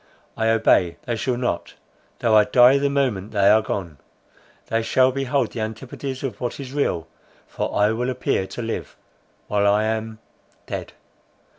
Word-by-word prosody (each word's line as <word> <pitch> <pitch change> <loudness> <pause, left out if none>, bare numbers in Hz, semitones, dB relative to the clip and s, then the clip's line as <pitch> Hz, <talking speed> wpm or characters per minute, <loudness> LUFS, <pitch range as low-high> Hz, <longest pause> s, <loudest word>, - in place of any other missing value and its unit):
I 110 - 0
obey; 110 -6 +3
they 120 - -1
shall 125 +2 -1
not, 125 0 -3 0.4
though 110 -2 +2
I 105 -1 +6
die 125 +3 +6
the 140 0 +1
moment 120 -8 -1
they 100 -1 +4
are 110 +1 +5
gone. 85 -9 -5 0.7
They 115 - 0
shall 130 +3 +3
behold 135 -2 -1
the - - -6
antipodes 130 +4 -5
of 125 -5 -5
what 120 +2 -3
is 135 -1 -7
real—for 85 - -4
I 105 +1 +4
will 120 +3 -1
appear 125 -6 -1
to 120 - -6
live—while 105 -2 -4
I 105 +1 +2
am—dead." 110 0 -6
115 Hz, 150 wpm, -22 LUFS, 105-130 Hz, 0.7 s, I